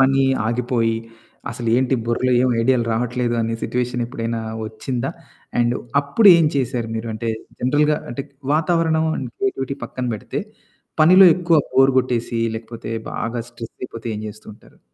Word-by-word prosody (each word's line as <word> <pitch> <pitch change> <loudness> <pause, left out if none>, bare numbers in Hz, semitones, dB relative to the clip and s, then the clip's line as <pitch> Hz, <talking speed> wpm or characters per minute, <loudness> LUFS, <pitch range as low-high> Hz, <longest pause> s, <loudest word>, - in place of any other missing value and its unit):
పని 135 0 +4 0.2
ఆగిపోయి, 115 -1 0 0.5
అసలేంటి 120 +3 +1
బుర్రలో 125 +2 +1
ఏమి 125 -1 +2
ఐడియాలు 125 -1 +2
రావట్లేదు 120 +1 -1
అనే 115 0 -1
సిట్యుయేషన్ 125 0 -1
ఎప్పుడైనా 115 -2 -3 0.3
వచ్చిందా? 125 +5 -3 0.5
అండు 120 +1 +2 0.2
అప్పుడేం 170 +4 +6
చేశారు 120 -3 -1
మీరు? 110 +1 -4
అంటే, 115 +1 -4 0.3
జనరల్‌గా 150 +4 +2
అంటే 130 +3 -4 0.3
వాతావరణం 160 0 +2
అండ్ 125 - -4
క్రియేటివిటీ 140 -9 -2
పక్కన 130 - -5
పెడితే, 105 - -4 0.6
పనిలో 185 +4 +8
ఎక్కువ 170 -2 +3 0.2
బోర్ 135 0 +5
కొట్టేసి, 120 -2 -1 0.2
లేకపోతే 115 0 -7 0.2
బాగా 115 0 -3
స్ట్రెస్ 115 -1 -9
అయిపోతే 115 -2 -7
ఏం 105 - -6
చేస్తూ 105 +1 -12
ఉంటారు. - - -22
125 Hz, 135 wpm, -21 LUFS, 115-135 Hz, 0.6 s, పనిలో